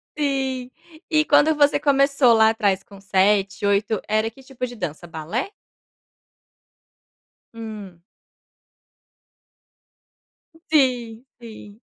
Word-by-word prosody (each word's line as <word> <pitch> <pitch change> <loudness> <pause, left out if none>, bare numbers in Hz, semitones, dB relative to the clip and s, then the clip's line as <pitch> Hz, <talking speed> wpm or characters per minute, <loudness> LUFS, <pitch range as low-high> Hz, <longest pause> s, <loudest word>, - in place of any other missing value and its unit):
Sim, 265 -3 -2 0.4
e 310 -1 +2
quando 315 +1 +4
você 290 -1 +3
começou 275 -3 +3
lá 220 -1 +5
atrás 205 -4 0
com 200 -1 -15
7, 195 0 +1
8 200 +1 0
era 215 +1 0
que 270 - -18
tipo 260 -1 -6
de 245 -1 -9
dança, 165 -6 -6
balé? 165 - -4 2.0
Hum. 210 -6 -9 2.7
Sim, 250 -5 +1 0.2
sim. 215 -2 -12
225 Hz, 95 wpm, -22 LUFS, 200-270 Hz, 2.7 s, lá